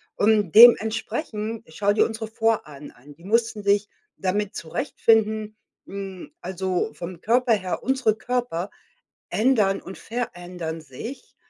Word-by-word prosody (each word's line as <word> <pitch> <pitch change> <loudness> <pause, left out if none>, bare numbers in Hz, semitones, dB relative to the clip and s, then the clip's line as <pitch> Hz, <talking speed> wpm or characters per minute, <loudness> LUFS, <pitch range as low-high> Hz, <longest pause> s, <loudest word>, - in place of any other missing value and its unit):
und 210 -5 +2
dementsprechend, 225 0 +4
schau 205 +2 +1
dir 210 - +3
unsere 220 -1 -4
Vorahnen 220 -11 -2
an. 140 +4 -17
Die 170 - -20
mussten 220 0 0
sich 200 +1 +2 0.3
damit 195 +2 -2
zurechtfinden 215 - 0 0.3
hm, 195 +3 -7
also, 185 -1 -2
vom 175 0 -8
Körper 240 +1 +3
her 185 -3 -2
unsere 255 -4 +1
Körper 240 -6 -2 0.6
ändern 215 -5 +2
und 190 - -9
verändern 175 -8 -5
sich, 155 - -9
210 Hz, 120 wpm, -24 LUFS, 185-225 Hz, 0.6 s, dementsprechend